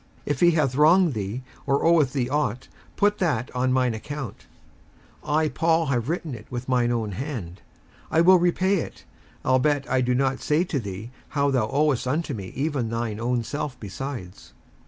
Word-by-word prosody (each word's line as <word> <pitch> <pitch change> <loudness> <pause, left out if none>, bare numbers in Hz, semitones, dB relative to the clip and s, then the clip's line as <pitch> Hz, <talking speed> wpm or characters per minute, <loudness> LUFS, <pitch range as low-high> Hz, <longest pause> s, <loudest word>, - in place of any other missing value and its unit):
57:001:018 - - -1
If 140 - -1
he 175 0 +6
hath 150 -6 +1
wronged 165 +3 +5
thee, 105 +4 -4 0.2
or 140 +2 +2
oweth 160 -6 +4
thee 130 -4 0
ought, 130 -3 -1 0.3
put 205 0 +2
that 135 -9 -1
on 130 +1 +1
mine 130 -2 +2
account; 135 +2 -7 0.8
57:001:019 150 0 -1
I 155 -1 +2
Paul 165 +4 +2
have 125 -2 -1
written 165 -3 -2
it 110 -2 -9
with 125 0 -5
mine 125 -2 +2
own 115 -3 -1
hand, 100 - -5 0.5
I 160 - +3
will 185 +1 +7
repay 185 +3 +2
it: - - -6 0.4
albeit 135 +2 +2
I 130 -1 +2
do 125 0 +1
not 135 0 0
say 150 +3 +2
to 160 -6 -2
thee 105 +1 -7 0.3
how 140 0 +3
thou 125 -5 +1
owest 145 -2 +1
unto 155 +6 -1
me 100 -4 -6
even 135 -4 -1
thine 115 -2 -3
own 120 0 0
self 145 +1 -4
besides. 105 -2 -7
135 Hz, 185 wpm, -25 LUFS, 120-150 Hz, 0.8 s, will